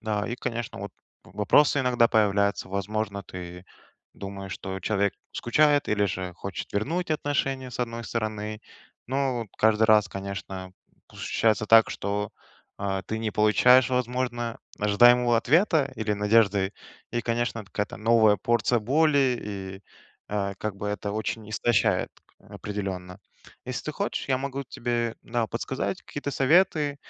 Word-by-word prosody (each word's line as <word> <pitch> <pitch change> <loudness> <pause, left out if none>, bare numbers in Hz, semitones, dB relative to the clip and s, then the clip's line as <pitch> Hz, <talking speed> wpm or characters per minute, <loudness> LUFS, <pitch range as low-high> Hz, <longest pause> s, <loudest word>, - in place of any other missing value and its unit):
Да. 105 -2 -2
И, 120 - -2
конечно, 120 -4 -4
вот 100 - -6 0.3
вопросы 105 +11 +3
иногда 120 -2 +3
появляются. 100 -3 +2
Возможно, 100 +1 -3
ты 90 0 -9 0.5
думаешь, 100 -1 -7
что 95 0 -6
человек 100 +1 0 0.2
скучает 145 +4 +2
или 105 -1 +2
же 90 -2 -3
хочет 95 +1 -6
вернуть 160 - -1
отношения, 135 -4 -1
с 125 - -8
одной 115 -1 -3
стороны. 110 -2 -3 0.5
Но 135 -1 0
вот 115 - -4
каждый 110 0 +3
раз, 105 -2 +5
конечно, 95 -1 -6 0.4
п - - -17
ощущается 110 -1 +1
так, 115 +1 +7
что, 100 +1 -3 0.5
э, 95 -1 -2
ты 110 - -3
не 110 -1 -2
получаешь, 125 +4 +5
возможно, 125 -2 -2 0.2
ожидаемого 120 +3 +5
ответа 150 - +3
или 110 -1 -1
надежды. 105 -2 +3 0.4
И, 120 - 0
конечно, 115 0 -1
от 105 - -12
какая-то 105 0 -3
новая 110 -1 +4
порция 120 0 +1
боли- 140 0 +3
и, 95 -2 -6 0.5
э, 100 -1 -2
как 110 -2 -3
бы 105 +1 -4
это 105 0 -3
очень 110 0 -4
истощает, 120 0 +1 0.3
к - - -19
определенно. 95 -2 -5 0.5
Если - - -4
ты - - -3
хочешь, - - -3
я 130 -2 +2
могу 140 0 -4
тебе, 120 -2 -2
да, 115 -1 -1
подсказать - - -3
какие-то 145 - -5
советы. 150 0 +3
110 Hz, 145 wpm, -26 LUFS, 100-125 Hz, 0.5 s, так